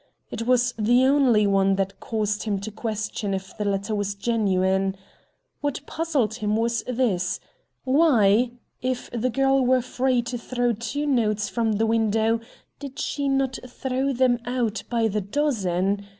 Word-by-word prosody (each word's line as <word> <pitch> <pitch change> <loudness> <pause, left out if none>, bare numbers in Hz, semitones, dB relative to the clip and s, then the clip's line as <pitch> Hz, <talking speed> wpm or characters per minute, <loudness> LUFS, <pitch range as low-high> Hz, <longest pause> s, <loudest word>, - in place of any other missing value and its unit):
It 230 0 -4
was 250 -1 +3
the 240 +4 +4
only 260 -6 +4
one 195 -1 +3
that 195 0 -2
caused 210 -2 -2
him 210 -3 -1
to 220 +2 -5
question 210 -2 -3
if 190 -1 -7
the 210 - -3
letter 200 +1 -1
was 205 -1 -1
genuine. 195 -3 +1 0.6
What 290 0 -3
puzzled 295 -10 -1
him 215 -2 -1
was 230 +1 0
this: 225 -8 0 0.4
Why, 250 -6 +4 0.3
if 255 0 -3
the 245 +1 -1
girl 270 +1 +2
were 255 0 +3
free 255 -1 0
to 240 +1 -4
throw 245 0 0
two 235 +7 -3
notes 215 -6 +1
from 225 -2 0
the 220 +2 +1
window, 225 0 +2 0.4
did 280 -1 -8
she 280 -1 -2
not 270 -1 0
throw 265 +2 -2
them 250 -2 +2
out 245 -3 -1
by 230 -2 +1
the 210 0 -1
dozen? 200 -6 0
230 Hz, 155 wpm, -24 LUFS, 205-255 Hz, 0.6 s, the